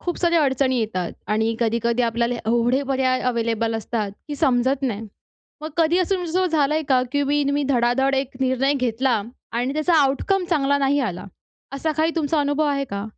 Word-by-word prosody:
खूप 350 - -3
साऱ्या 340 -2 +3
अडचणी 265 -1 +1
येतात. 185 -6 -2
आणि 220 +2 0
कधी-कधी 235 +1 +1
आपल्याला 235 +1 0
एवढे 240 +4 +2
पर्याय 260 -1 +1
अवेलेबल 230 -1 -1
असतात, 220 -2 -3 0.2
की 290 - -4
समजत 260 +1 +1
नाही. 225 -4 -2 0.5
मग 310 +1 -6
कधी 335 +1 +3
असं 370 +1 +1
तुमचं 360 +1 0
झालं 305 -4 +1
आहे 315 - 0
का, 255 -2 +4
की 285 - +1 0.3
तुम्ही 285 +1 +1
धडाधड 265 +1 +2
एक 265 -1 -2
निर्णय 265 +2 +1
घेतला 250 -3 0 0.3
आणि 245 +3 -1
त्याचा 310 +3 +1
आउटकम 360 +8 0
चांगला 285 -3 +2
नाही 280 +1 +2
आला. 175 - -8 0.5
असा 290 +3 -2
काही 320 +1 +2
तुमचा 310 -1 0
अनुभव 290 +1 +1
आहे 280 -1 0
का? 200 -5 -5
265 Hz, 180 wpm, -22 LUFS, 235-290 Hz, 0.5 s, का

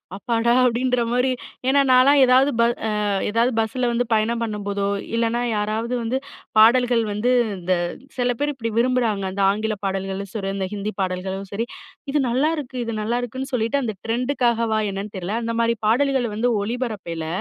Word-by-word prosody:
அப்பாடா 230 +2 0
அப்படின்ற 250 0 +1
மாரி. 250 +2 +2 0.4
ஏன்னா 280 +1 +4
நான்லா 255 +2 +6
ஏதாவது 260 +2 +5
ப - - +6 0.7
ஏதாவது 230 +4 +2
பஸ்ஸில 240 +3 0
வந்து 245 +1 0
பயணம் 230 +2 +1
பண்ணும்போதோ 205 -2 -3 0.3
இல்லைனா 230 +1 +1
யாராவது 215 +3 -1
வந்து 235 +3 -1 0.4
பாடல்கள் 240 +1 +5
வந்து 210 +4 0 0.3
இந்த 180 +1 0 0.4
சில 245 0 +1
பேரு 290 0 0
இப்படி 230 -3 -3
விரும்புறாங்க 235 -5 +1
அந்த 200 +1 -3
ஆங்கில 215 +1 -2
பாடல்களும் 195 0 -3
சரி, 195 -3 -3
அந்த 190 -1 -2
ஹிந்தி 205 +1 -3
பாடல்களும் 190 +1 -3
சரி 225 +4 -2 0.5
இது 295 - +2
நல்லாயிருக்கு 275 0 -1
இது 230 -1 -4
நல்லாயிருக்குன்னு 245 +4 -3
சொல்லிட்டு 250 +4 +1
அந்த 220 -4 -3
ட்ரெண்டுக்காகவா 235 -2 +1
என்னன்னு 195 +1 -6
தெரியல. 190 +5 -3
அந்த 230 0 -2
மாதிரி 230 0 +2
பாடல்கள் 265 +1 +2
வந்து 235 +3 +1 0.2
ஒளிபரப்பேயல 205 -9 -4
230 Hz, 150 wpm, -22 LUFS, 210-250 Hz, 0.7 s, நான்லா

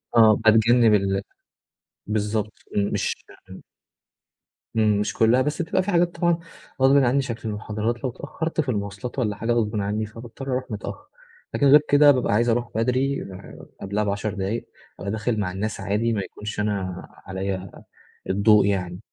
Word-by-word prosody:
آه، 110 -2 +7
باتجنّب 110 +1 +4
ال 95 -1 +2 0.9
بالضبط، 105 0 -1 0.2
مش 100 0 -1 0.2
آمم 95 - -10 1.1
إمم، 105 -2 +3
مش 105 - -1
كلّها 115 +3 +4
بس 150 +2 -1
تبقى 175 +2 0
في 205 - -2
حاجات 175 0 +2
طبعًا 170 -1 +1 0.4
غصبٍ 135 +1 +6
عني 135 +1 +3
شكل 115 -3 -5
المحاضرات 110 +3 -3
لو 130 - 0
اتأخّرت 160 +5 -3
في 135 - -5
المواصلات 105 +4 -4
والًا 105 -4 0
حاجة 115 +3 -2
غصبٍ 110 -2 +1
عني 105 +2 -1
فباضطر 115 +5 -10
أروح 130 0 -1
متأخّر، 285 - -6 0.5
لكن 140 - +1
غير 145 +2 +8
كده 145 0 +7
بابقى 125 -6 +1
عايز 120 +3 +2
أروح 120 +1 0
بدري 130 +4 0 0.6
قبلها 100 +2 -1
ب10 105 +1 -2
دقايق، 100 +4 -3 0.3
أبقى 100 - -4
داخل 110 +1 -1
مع 90 -3 -1
الناس 105 +3 -3
عادي 115 +4 0
ما 100 - -1
يكونش 105 +1 -7
أنا 100 -4 -2 0.2
عليَّ 95 0 -4 0.6
الضوء 100 +1 +4
يعني، 90 -3 -1
110 Hz, 155 wpm, -24 LUFS, 100-125 Hz, 1.1 s, غير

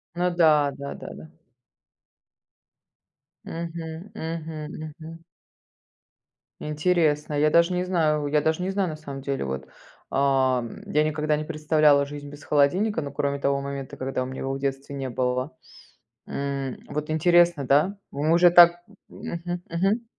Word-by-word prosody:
Ну 180 +1 +1
да, 155 -4 +4
да 140 0 -6
да - - -9
да. 160 - -11 2.2
Мгм 165 -1 -6 0.2
мгм 160 -3 -5
мгм. 160 +1 -9 1.4
Интересно. 150 -1 +1
Я 150 +1 +3
даже 170 +3 +4
не 180 0 0
знаю 155 -5 +1
я 150 +1 +2
даже 160 +4 0
не 190 - -1
знаю, 195 -2 0
на 155 - -6
самом 140 -3 -8
деле, 140 - -2
вот. 65 0 -4 0.4
Ам, 130 -3 +1
я 150 - +2
никогда 155 0 0
не 155 - -3
представляла 150 -2 +3
жизнь 145 0 -8
без 145 +1 -12
холодильника, 170 +8 +2
ну, 140 - -5
кроме 140 0 -1
того 140 0 +1
момента, 140 -1 -6
когда 130 0 -2
у 130 - -3
меня 130 0 -7
его 135 0 -2
в 135 - -3
детстве 135 0 -3
не 135 -2 -4
было. 125 +2 -2 0.7
М, 140 -2 -3
вот 150 +1 -4
интересно, 170 -2 +3
да? 150 +10 +3
Вы 150 +3 0
уже 175 +1 +6
так 175 0 +7 0.3
Мгм 175 +1 -5
мгм. 195 +8 0
150 Hz, 150 wpm, -25 LUFS, 140-170 Hz, 2.2 s, так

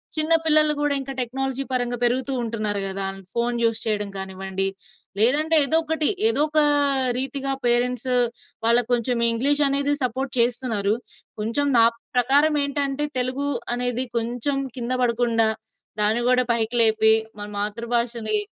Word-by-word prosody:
చిన్న 310 +1 +2
పిల్లలు 305 -1 +4
గూడా 290 -1 +1
ఇంకా 270 0 -7
టెక్నాలజీ 265 +2 -3
పరంగా 245 -1 -1
పెరుగుతూ 255 +3 0
ఉంటున్నారు 215 -3 -2
గదా! 195 0 -4 0.3
ఫోన్ 240 0 -1
యూజ్ 225 0 0
చేయడం 210 -1 -1
కానివ్వండి 190 0 -3 0.5
లేదంటే 300 +8 +3
ఏదో 315 +3 +5
ఒకటి 320 -1 0 0.2
ఏదో 450 - +2
ఒకా 305 0 +4 0.5
రీతిగా 270 +1 -2
పేరెంట్స్ 245 +1 0 0.5
వాళ్ళకి 235 0 +3
కొంచెం 240 0 0
ఇంగ్లీష్ 285 +6 +1
అనేది 280 +1 +1
సపోర్ట్ 255 +2 -2
చేస్తున్నారు. 235 -4 +1 0.5
కొంచెం 230 +7 -1
నా 230 - +6 0.3
ప్రకారం 280 +5 +3
ఏంటంటే 280 0 -2
తెలుగు 255 +3 -1 0.3
అనేది 245 +1 -1
కొంచెం 245 +4 -2 0.2
కింద 240 +1 -4
పడకుండా, 235 -2 +1 0.5
దాన్ని 220 +3 +2
గూడా 250 0 +3
పైకి 225 +1 -2
లేపి 220 0 +4 0.3
మన 205 - -6
మాతృభాషని 230 +1 -2
245 Hz, 135 wpm, -22 LUFS, 225-275 Hz, 0.5 s, నా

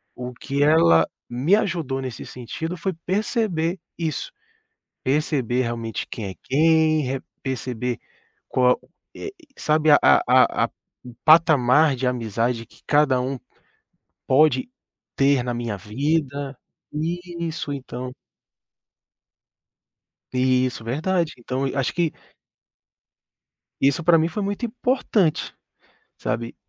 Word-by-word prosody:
o 125 0 -6
que 140 +3 -3
ela 85 - +5 0.2
me 135 +11 +3
ajudou 165 -10 -1
nesse 130 -3 -6
sentido 160 +8 -6
foi 190 +2 -2
perceber 190 -4 0 0.2
isso, 160 - -3 0.7
perceber 130 -3 +1
realmente 115 -2 -3
quem 110 - -5
é - - -8
quem, 155 +2 +3
re 135 0 -2 0.2
perceber 125 -2 -3 0.5
qual 125 -1 +3 0.4
é - - -6 0.3
sabe, 155 0 +2
a 145 - +8
a - - +5
a - - -19 0.4
o 125 - -10
patamar 155 -3 +5
de 125 +1 -2
amizade 115 -1 -1
que - - -22
cada 145 -4 +3
um 130 +1 -2 0.9
pode 135 - +4 0.5
ter 135 -2 +3
na 125 - -2
minha 120 -3 -3
vida 140 +5 -2 0.4
isso, 170 -1 -4
então 125 -2 -6 2.2
Isso, 125 -1 +1
verdade. 160 +7 0
Então 130 +3 -3
acho 135 -2 0
que 170 -3 +1 1.7
Isso 140 +5 +2
pra 170 0 +6
mim 160 0 +2
foi 210 - -4
muito 205 +4 -2
importante, 230 - 0 0.6
sabe, 115 0 -3
140 Hz, 110 wpm, -23 LUFS, 125-160 Hz, 2.2 s, a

